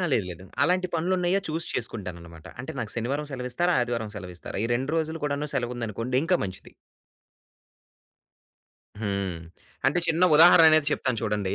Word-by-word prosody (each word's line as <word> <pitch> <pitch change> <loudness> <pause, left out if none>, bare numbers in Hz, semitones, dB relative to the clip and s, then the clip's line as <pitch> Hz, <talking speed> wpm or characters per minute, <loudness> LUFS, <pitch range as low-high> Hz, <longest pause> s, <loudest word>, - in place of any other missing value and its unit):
లేదు 105 - +2
లేదు. 90 +2 -10 0.2
అలాంటి 180 +4 +2
పనులు 170 +3 0
ఉన్నాయా 180 +2 +1
చూసి 160 +2 -3
చేసుకుంటాననమాట. 85 -8 -6
అంటే 130 - -6
నాకు 115 -3 -4
శనివారం 140 +6 -2
సెలవు 125 -1 -4
ఇస్తారా? 175 +6 +1
ఆదివారం 115 -3 -3
సెలవు 90 -2 -8
ఇస్తారా? 90 - -6
ఈ - - +1
2 135 +4 -1
రోజులు 160 0 -1
కూడాను 145 +1 -2
సెలవుందనుకోండి 120 0 -2
ఇంకా 180 +2 +3
మంచిది. 95 0 -8 2.3
హ్మ్. 100 -5 -2 0.5
అంటే 145 +6 +3
చిన్న 165 +2 +1
ఉదాహరణ 165 0 +8
అనేది 155 -2 +4
చెప్తాను 130 -4 -1
చూడండి, 105 -3 -1
125 Hz, 150 wpm, -26 LUFS, 105-160 Hz, 2.3 s, ఉదాహరణ